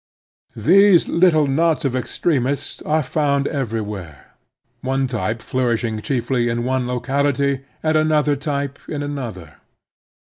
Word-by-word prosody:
These 185 - +5
little 165 -3 +4
knots 160 +3 +1
of 130 -2 0
extremists 130 +2 -1
are 155 0 +2
found 140 0 0
everywhere, 105 - -4 0.5
one 135 +1 0
type 115 -2 -3
flourishing 120 -3 -1
chiefly 120 -2 0
in 120 0 -1
one 130 0 0
locality 135 +2 0 0.2
and 155 0 +1
another 155 -1 +3
type 140 -1 -3
in 145 -2 -3
another. 120 - -6
135 Hz, 115 wpm, -20 LUFS, 120-150 Hz, 0.5 s, These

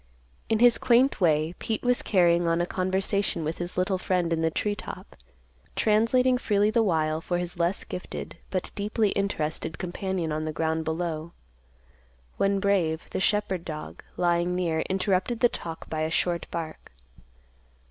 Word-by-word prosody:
In 225 - +3
his 240 +1 +5
quaint 255 0 +3
way, 155 -1 +3
Pete 220 - -2
was 245 0 +2
carrying 175 -3 +3
on 165 0 +2
a 175 - +2
conversation 190 0 0
with 155 +2 -3
his 175 0 -5
little 185 +1 +1
friend 180 -3 0
in 160 - 0
the 160 - +2
tree 205 +5 -1
top, 205 - -9 0.6
translating 250 +4 +3
freely 205 -1 +2
the 230 +1 +3
while 160 -6 +1
for 175 +1 -1
his 175 0 -5
less 170 +3 +1
gifted, 180 - -7
but 185 -2 -2
deeply 210 +1 0
interested, 160 -5 -2
companion 180 -2 -3
on 155 +1 -1
the 155 - -2
ground 160 +1 -1
below, 160 0 -3 1.0
when 195 0 +2
Brave, 180 -5 0
the - - -2
shepherd 195 -3 +1
dog, 155 -3 -7
lying 175 0 +1
near, 170 -3 0
interrupted 190 +4 0
the 245 - +5
talk 165 -6 -6
by 155 -1 -3
a 155 - 0
short 170 +1 0
bark. 160 -2 -6
180 Hz, 160 wpm, -27 LUFS, 165-200 Hz, 1.0 s, his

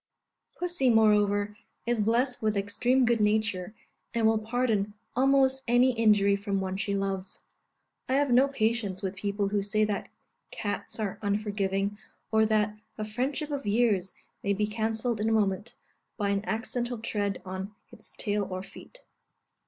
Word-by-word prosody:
Pussy, 350 -7 +1
moreover, 210 -2 +3 0.3
is 235 -2 +1
blessed 245 +4 +1
with 215 -2 +1
extreme 245 +6 +2
good 235 -2 +2
nature, 210 -2 +1 0.4
and 230 -1 +2
will 220 0 +4
pardon 215 -3 0 0.2
almost 265 +1 +3
any 245 +2 +5
injury 210 -4 +4
from 200 -1 -2
one 190 0 -2
she 200 +1 -1
loves. 195 -1 -3 0.7
I - - +1
have 280 -1 +2
no 255 +3 +6
patience 220 -7 -1
with 190 0 -2
people 200 0 -1
who 205 0 +1
say 215 +2 +1
that 210 -1 -2 0.4
cats 205 +1 -4
are 210 -3 -3
unforgiving, 205 -1 -1 0.3
or 220 0 +4
that 215 -1 +1 0.2
"a 215 - -3
friendship 270 +7 -2
of 280 -6 -3
years 205 -4 +2 0.3
may 200 - +1
be 210 +2 +1
cancelled 220 +1 -1
in 220 - +1
a - - +2
moment, 210 +2 0 0.4
by 205 -2 0
an 200 0 0
accidental 240 +2 -2
tread 205 -3 -2
on 190 +2 -6 0.2
its - - -12
tail 205 -1 -1
or 185 0 -4
feet." - - -13
215 Hz, 155 wpm, -28 LUFS, 200-235 Hz, 0.7 s, no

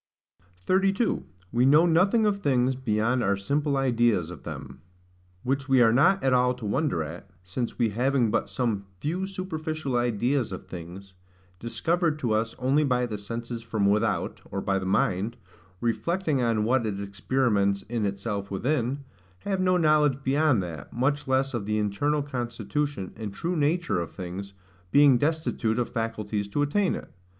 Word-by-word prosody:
32. 195 - +1 0.2
We 120 +1 +2
know 150 +6 +6
nothing 190 +7 +3
of 205 -1 +1
things 130 -3 +2
beyond 120 0 0
our 100 +1 +2
simple 140 +7 0
Ideas 120 -9 +2
of 90 - -10
them. - - -8 0.6
Which 135 +2 -1
we 135 -1 +5
are 115 -1 +5
not 150 +10 +4
at 135 -1 +3
all 125 0 +3
to 120 -3 -8
wonder 105 - 0
at, 80 +3 -9
since 105 +7 -4
we 115 -2 +2
having 125 0 +1
but - - 0
some 110 -6 -2
few 180 - -2
superficial 155 -7 -4
ideas 120 +1 +1
of 95 - -7
things, 90 +3 -9 0.5
discovered 155 - 0
to 125 -7 -2
us 110 +1 0
only 135 +4 +2
by 125 -3 +1
the 110 -4 -5
senses 115 +3 -5
from 110 -3 -1
without, 105 +2 +1
or 100 - -3
by 95 0 0
the 95 - -4
mind, 95 +3 +1 0.4
reflecting 155 +5 0
on 115 -3 +1
what 120 +3 +2
it 100 -2 -3
experiments 100 0 0
in 115 -1 -3
itself 100 0 -3
within, 130 +6 -1 0.4
have 195 -2 -1
no 185 0 +3
knowledge 150 -4 +3
beyond 135 -5 +2
that, 85 -3 -8
much 145 +3 0
less 135 +1 +1
of 110 -4 -3
the 105 0 0
internal 140 +9 0
constitution, 125 -2 -3
and 105 -3 -6
true 175 - -2
nature 155 - +1
of 85 - -3
things, 95 +2 -7 0.4
being 140 -4 +6
destitute 145 -7 0
of 125 - 0
faculties 110 -3 -2
to 145 +8 0
attain 185 +7 +1
it. - - -9
125 Hz, 165 wpm, -26 LUFS, 105-145 Hz, 0.6 s, know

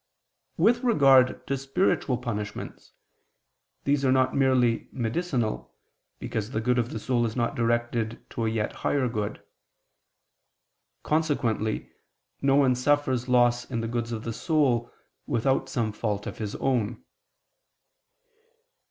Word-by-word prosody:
With 225 +8 +4
regard 135 - +4
to 140 - -1
spiritual 135 -1 0
punishments, 105 -4 -6 0.9
these 140 0 +1
are 130 - +3
not 130 0 +2
merely 130 -4 +2
medicinal, 120 - -2 0.4
because 110 -1 -4
the 115 - -2
good 125 +2 +1
of 120 0 -1
the - - -5
soul 120 +2 0
is 115 -2 -2
not 120 -2 0
directed 120 -1 -1
to 115 -1 -2
a - - +2
yet 110 -1 -2
higher 135 -3 +1
good. 105 -3 -4 1.6
Consequently 135 -9 0 0.5
no 135 0 +3
one 135 -3 +4
suffers 130 -1 +1
loss 120 -1 +3
in 115 -3 -2
the 115 - -3
goods 120 0 -3
of 110 -1 -4
the 115 - -4
soul 130 -5 +1 0.4
without 130 +3 +1
some 115 -5 -1
fault 105 -1 -3
of - - -7
his 105 -2 -4
own. 120 -4 -1
120 Hz, 130 wpm, -26 LUFS, 115-135 Hz, 1.6 s, With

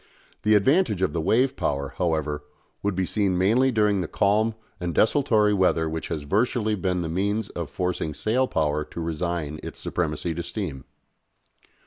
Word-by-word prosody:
The 105 0 +4
advantage 105 - +3
of 95 - +1
the 85 - -1
wave 130 +10 +2
power, 70 -1 -2
however, 80 -3 0 0.4
would 100 -2 -1
be 95 0 0
seen 95 -2 0
mainly 115 +8 +3
during 105 -4 +2
the 85 - -3
calm 110 +5 +2 0.2
and 90 -3 -3
desultory 110 -4 +3
weather 90 -4 +2
which 80 0 -4
has 80 -3 -3
virtually 110 +6 +1
been 90 -3 -1
the - - -3
means 100 +5 -1
of 85 -4 -5
forcing 85 -1 -2
sail 125 +4 +1
power 75 -4 0
to 85 - -9
resign 80 -2 -3
its - - -8
supremacy 85 0 -2
to 85 - -4
steam. 85 -7 -5
90 Hz, 165 wpm, -25 LUFS, 80-105 Hz, 0.4 s, The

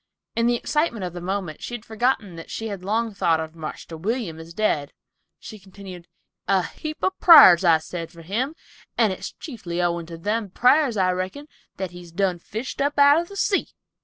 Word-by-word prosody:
In 230 0 +2
the 240 - +3
excitement 235 - -1
of 175 - -6
the 175 - -7
moment 185 -3 -4
she 240 - -5
had 235 -1 -9
forgotten 220 -4 -1
that 165 - -10
she 225 0 -4
had 195 -3 -6
long 220 +3 -1
thought 165 -5 +1
of 160 0 -5
"Marster 160 0 -8
William" 190 -1 -3
as 160 +1 -10
dead; 165 -7 -1 0.4
she 215 - -11
continued, 190 -2 -12 0.4
"A 190 -2 +3
heap 310 0 -7
of 375 0 0
prars 190 - +9
I 165 -3 +6
said 165 +1 -7
for 170 -1 -14
him, 245 - -2 0.4
and 220 -5 +3
it's - - -7
chiefly 220 - -6
owin' 170 -1 -1
to 165 -1 -8
them 210 +4 -2
prars, 250 - +3
I 185 -1 +3
reckon, 185 +11 -4 0.3
that 190 -2 -4
he's 175 -1 -12
done 185 0 0
fished 225 +10 -6
up 285 +1 0
out 285 +3 +6
of 345 - -8
the 400 - -11
sea." 390 +2 +1
195 Hz, 200 wpm, -23 LUFS, 175-240 Hz, 0.4 s, prars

